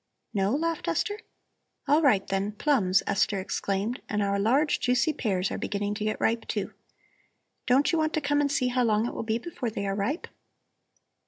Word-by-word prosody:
"No?" 200 +3 +1
laughed 330 +2 -2
Esther. 415 0 -1 0.7
"All 295 +3 +4
right, 250 -11 +4
then, 195 +2 -1
plums," 205 -7 +2
Esther 200 0 +1
exclaimed. 200 +4 -2
"And 210 -1 0
our 200 0 0
large 270 +9 +2
juicy 250 +5 +2
pears 190 -8 -1
are - - -3
beginning 205 0 -2
to 210 - -4
get 215 0 -1
ripe, 230 0 0
too. - - -3 0.9
Don't 260 +3 +4
you 330 - +1
want 310 0 0
to - - +1
come 290 0 +1
and 285 -1 +1
see 255 -3 +1
how 250 0 +1
long 220 -1 +2
it - - -3
will - - -4
be 225 0 0
before 250 -2 -4
they 200 -2 -4
are 195 - -1
ripe?" 210 - -2
225 Hz, 190 wpm, -27 LUFS, 200-285 Hz, 0.9 s, All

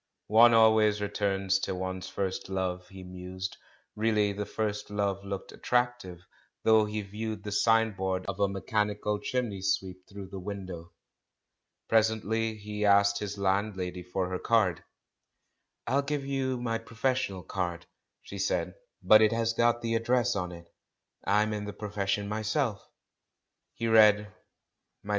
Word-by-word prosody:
"One 115 +1 +8
always 110 -2 +5
returns 95 -1 0
to 95 - -3
one's 95 0 -4
first 95 -1 -3
love," 95 -1 -2
he 95 -2 -10
mused; 90 +1 -6 0.4
and 105 - -9
really 105 -2 +2
the 105 +1 -4
first 105 -2 -3
love 100 -1 -1
looked 100 -1 -6
attractive, 120 -8 -1 0.4
though 110 -1 +5
he 105 0 -3
viewed 105 +1 -5
the 105 - -5
signboard 100 -4 +1
of 100 0 -5
a 100 - +3
"mechanical 105 +1 -1
chimney 115 -7 -2
sweep" 95 0 -2
through 100 -2 -9
the 95 - -7
window. 90 -3 -7 1.0
Presently 110 0 +1
he 105 0 -5
asked 100 0 +4
his 105 -1 -5
landlady 95 -2 -1
for 90 +1 -2
her 90 0 -3
card, 105 -7 +2 1.0
"I'll 135 - +1
have 140 0 0
to 150 - -1
give 140 - -7
you 135 -2 -1
my 115 -2 -1
professional 115 -4 -2
card," 85 -1 -3 0.4
she 100 - -8
said, 100 - 0 0.3
"but 110 0 +7
it 110 - +5
has 115 0 0
got 120 +1 +2
the 115 0 -1
address 120 +1 +1
on 90 -2 -2
it; 85 -1 -11 0.6
I'm 105 +2 +2
in 105 -1 -4
the 105 - -6
profession 100 -1 -2
myself." 110 +1 -2 0.9
He 115 - -2
read, 105 -2 +5 0.7
"Mdlle. - - -10
105 Hz, 150 wpm, -29 LUFS, 95-110 Hz, 1.0 s, One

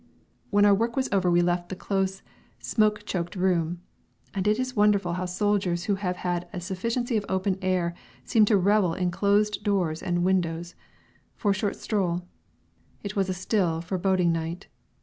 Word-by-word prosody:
When 205 -1 +4
our 205 - +6
work 230 +4 0
was 265 -1 0
over 190 -3 +2
we 175 0 +4
left 175 0 0
the 190 - -4
close, 190 0 -2 0.3
smoke 210 - +1
choked 175 0 -3
room 175 -2 0 0.5
(and 195 0 -1
it 210 +1 +3
is 255 0 -2
wonderful 205 -4 +3
how 180 +1 -2
soldiers 185 -2 0
who 205 - 0
have 190 -2 -2
had 175 -1 -2
a - - -5
sufficiency 230 +7 -2
of 205 - -2
open 190 0 0
air 180 -2 0
life - - -23 0.2
seem 220 -2 +4
to 210 -1 +4
revel 195 -2 +3
in 180 -1 0
closed 205 +3 +1
doors 180 -6 0
and 175 -1 0
windows!) 175 -2 0 0.6
for 205 - +1
a - - +3
short 200 +1 -1
stroll. 180 -4 -1 0.8
It 205 +1 -5
was 195 -2 +1
a - - 0
still, 180 -3 0
foreboding 180 0 +1
night. 165 +2 -3
190 Hz, 180 wpm, -26 LUFS, 175-205 Hz, 0.8 s, our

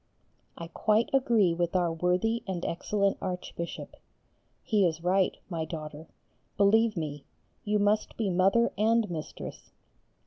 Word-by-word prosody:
I 170 - -6
quite 215 +6 +1
agree 230 -9 +3
with 175 +1 -1
our 175 -2 +2
worthy 180 +7 0
and 180 -2 -3
excellent 200 +3 0
Archbishop. 180 -2 -5 0.7
He 210 -3 +2
is 165 -2 0
right, 185 +1 +2
my 165 -4 -3
daughter, 155 -1 -7 0.5
believe 215 +1 +4
me, 145 -3 -4 0.4
you 210 0 +1
must 205 +1 +1
be 210 -4 0
Mother 195 +6 +3
and 225 +1 +3
Mistress. 160 -3 -7
185 Hz, 130 wpm, -28 LUFS, 170-215 Hz, 0.7 s, believe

